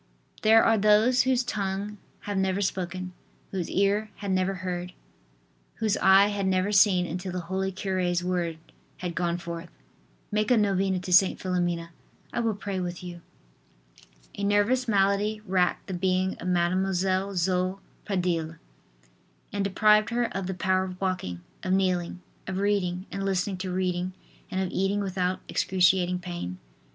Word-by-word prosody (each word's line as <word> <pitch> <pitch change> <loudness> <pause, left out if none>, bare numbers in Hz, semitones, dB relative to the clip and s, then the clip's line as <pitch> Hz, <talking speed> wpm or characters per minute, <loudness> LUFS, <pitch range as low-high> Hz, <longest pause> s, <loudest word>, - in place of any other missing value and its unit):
There 225 +1 +6
are 225 -1 +4
those 215 +5 +5
whose 255 -1 +3
tongue 205 -2 -3 0.2
had 205 - -4
never 190 0 +1
spoken, 185 -2 -3 0.4
whose 185 -3 -3
ear 200 +2 +1
had 200 -2 -4
never 185 +1 +1
heard, 180 -1 -4 0.8
whose 220 -2 0
eye 195 +1 +6
had 200 -2 -1
never 190 +2 +1
seen 190 -3 +5
until 180 +2 -4
the 180 0 -3
holy 190 +3 -2
cure's 185 -2 -1
word 175 -3 -1 0.4
had 180 -1 -4
gone 170 0 0
forth: 170 -1 -7 0.6
"Make 215 +2 +1
a 250 - +5
novena 195 -2 +2
to 180 0 -2
St. 185 +1 +5
Philomena; 175 -2 -1 0.4
I - - -1
will 225 -3 0
pray 200 -2 -4
with 175 0 -4
you." 175 -1 -8 1.1
A 200 - -6
nervous 205 +5 +2
malady 205 +1 +1
racked 180 -1 +1
the 190 - -6
being 185 +1 0
of - - -5
Mademoiselle 185 +2 +1
Zoe 185 +1 +1 0.3
Pradille 175 -5 -1 1.0
and 200 - 0
deprived 210 +2 +4
her 240 0 -1
of 195 -2 -2
the 190 - -3
power 185 +1 +1
of 185 -1 -7
walking, 180 - -2 0.2
of 185 - -1
kneeling, 180 -2 0 0.3
of 185 0 -3
reading 190 -2 0
and 195 - -3
listening 195 0 -1
to 185 0 -4
reading 180 0 -1 0.4
and 190 -2 -2
of 185 - -2
eating 195 +2 0
without 185 -1 -1
excruciating 180 -1 +2
pain. 175 - -6
190 Hz, 155 wpm, -27 LUFS, 180-200 Hz, 1.1 s, There